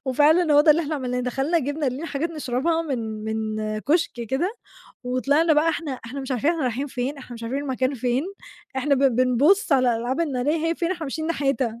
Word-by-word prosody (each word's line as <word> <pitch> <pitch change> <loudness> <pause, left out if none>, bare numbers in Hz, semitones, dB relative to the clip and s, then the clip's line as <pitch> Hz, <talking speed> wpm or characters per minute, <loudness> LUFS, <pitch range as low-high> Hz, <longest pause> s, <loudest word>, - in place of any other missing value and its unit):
وفعلًا 300 +5 +4
هو 290 - +8
ده 305 +1 +6
اللي 320 +3 +4
إحنا 310 0 -3
عملناه، 250 -3 -2
دخلنا 270 +7 0
جِبنا 290 +1 -2
لينا 270 +6 -3
حاجات 320 +4 -2
نشربها 305 +2 -1
من 225 -8 -4
من 215 -1 -2
كُشك 315 +9 +1 0.2
كده، 345 - -1 0.5
وطلعنا 280 +6 +2
بقى 305 +2 +3
إحنا 325 -3 -2
إحنا 275 +3 -6
مش 270 0 -7
عارفين 260 +5 +1
إحنا 330 -3 -2
رايحين 255 +3 -1
فين، 265 +2 -4
إحنا 250 -2 -10
مش 230 - -10
عارفين 250 +5 -2
المكان 260 0 -1
فين، 250 +1 0 0.5
إحنا 280 +2 +2
بن 275 0 +4
بنبُص 275 - +3
على 255 -3 +4
الألعاب 245 +6 -2
النارية 295 -1 0
هي 330 - +1
فين 340 +1 -2
إحنا 350 -3 -3
ماشيين 315 +3 -4
ناحيتها. 275 -7 -1
275 Hz, 205 wpm, -24 LUFS, 250-315 Hz, 0.5 s, هو